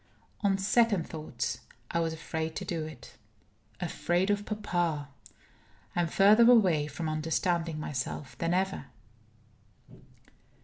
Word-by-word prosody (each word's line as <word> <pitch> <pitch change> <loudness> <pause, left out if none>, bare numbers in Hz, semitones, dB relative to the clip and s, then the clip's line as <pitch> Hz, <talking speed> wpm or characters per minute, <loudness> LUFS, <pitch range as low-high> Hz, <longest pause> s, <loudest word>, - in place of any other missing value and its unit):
On 200 -2 +2
second 205 -2 +2
thoughts, 135 -4 -4 0.3
I 170 - +1
was 165 -1 0
afraid 160 0 -4
to - - -4
do 165 -3 -2
it. 155 -6 -11 0.6
Afraid 175 +2 0
of 205 0 -1
papa! 175 -8 -1 0.9
I 175 - +2
am 170 - +1
further 210 +7 +6
away 180 -11 +5
from 155 +3 -4
understanding 165 +1 0
myself 140 -1 -4
than 165 0 0
ever. 190 -3 0
170 Hz, 120 wpm, -30 LUFS, 155-195 Hz, 0.9 s, further